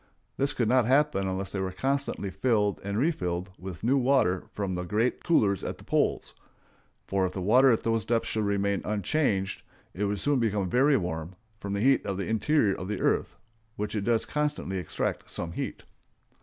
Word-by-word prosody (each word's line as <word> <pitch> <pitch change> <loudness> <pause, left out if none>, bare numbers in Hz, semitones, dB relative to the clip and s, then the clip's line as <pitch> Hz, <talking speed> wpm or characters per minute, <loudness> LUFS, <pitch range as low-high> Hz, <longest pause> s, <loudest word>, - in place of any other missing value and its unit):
This 140 +1 0
could 120 - 0
not 125 0 +3
happen 135 -7 +2
unless 95 0 -3
they 100 - -3
were 95 0 -2
constantly 135 -2 -2
filled 105 -3 +1
and 100 +1 -3
refilled 95 - -1
with 90 -3 -8
new 130 +5 +3
water 125 -9 +2
from 100 -3 -3
the 90 - -2
great 110 +7 0
coolers 105 - +2
at - - -4
the - - -15
poles; - - 0 0.7
for 95 -1 0
if 90 - -8
the 95 - -4
water 125 +7 +6
at 115 - +1
those 115 -1 +1
depths 115 +2 0
should 110 -1 -1
remain 100 0 0
unchanged, 105 - 0 0.3
it 100 +5 -1
would 100 0 -1
soon 145 -2 +2
become 105 -5 0
very 135 +3 +4
warm 80 -3 -4 0.3
from 100 0 -4
the 100 - -1
heat 135 +2 +4
of 100 -2 -3
the 100 - -2
interior 110 0 +2
of 90 - -6
the 105 -1 -3
earth, - - 0 0.4
whence 105 -1 -3
it 105 - -1
does 115 +1 +2
constantly 150 -10 -2
extract 90 - -3
some 85 - -4
heat. - - -5
105 Hz, 195 wpm, -28 LUFS, 95-125 Hz, 0.7 s, water